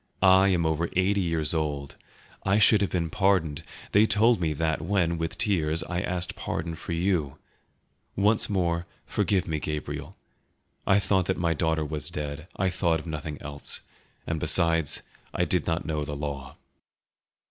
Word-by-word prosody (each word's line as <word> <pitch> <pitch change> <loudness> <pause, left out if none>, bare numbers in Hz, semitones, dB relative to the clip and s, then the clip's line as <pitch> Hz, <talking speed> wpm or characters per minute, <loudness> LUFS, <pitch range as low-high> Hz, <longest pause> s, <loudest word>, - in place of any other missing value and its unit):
I 95 +1 +7
am 90 -4 +2
over 80 +2 0
eighty 95 +2 +2
years 80 -3 +2
old; 75 -3 -2 0.5
I 95 +1 +2
should 105 -1 +6
have 100 - +1
been 85 -3 -1
pardoned; 90 -6 +1 0.3
they 105 +2 +5
told 110 -1 +4
me 80 -2 +1
that 80 +1 -1
when, 85 -2 0
with 80 0 -3
tears, 85 -7 +1
I 90 +1 -3
asked 90 -1 -3
pardon 85 0 -3
for 80 - -8
you; 85 -5 0 0.8
once 105 +2 +2
more, 85 -3 0 0.2
forgive 95 -4 0
me, 80 -1 -1
Gabriel; 75 0 -5 0.7
I 95 - +5
thought 95 -2 +1
my 85 -2 +1
daughter 80 -1 0
was 75 -2 -3
dead; 75 +2 -5
I 95 -1 0
thought 85 -3 +1
of 80 - -11
nothing 75 -2 -5
else; 70 0 -4 0.4
and 80 -1 -2
besides, 80 -1 +2 0.3
I - - +2
did - - 0
not 85 0 -1
know 75 -2 -2
the 75 0 -5
law." 70 -1 -5
85 Hz, 160 wpm, -27 LUFS, 75-95 Hz, 0.8 s, I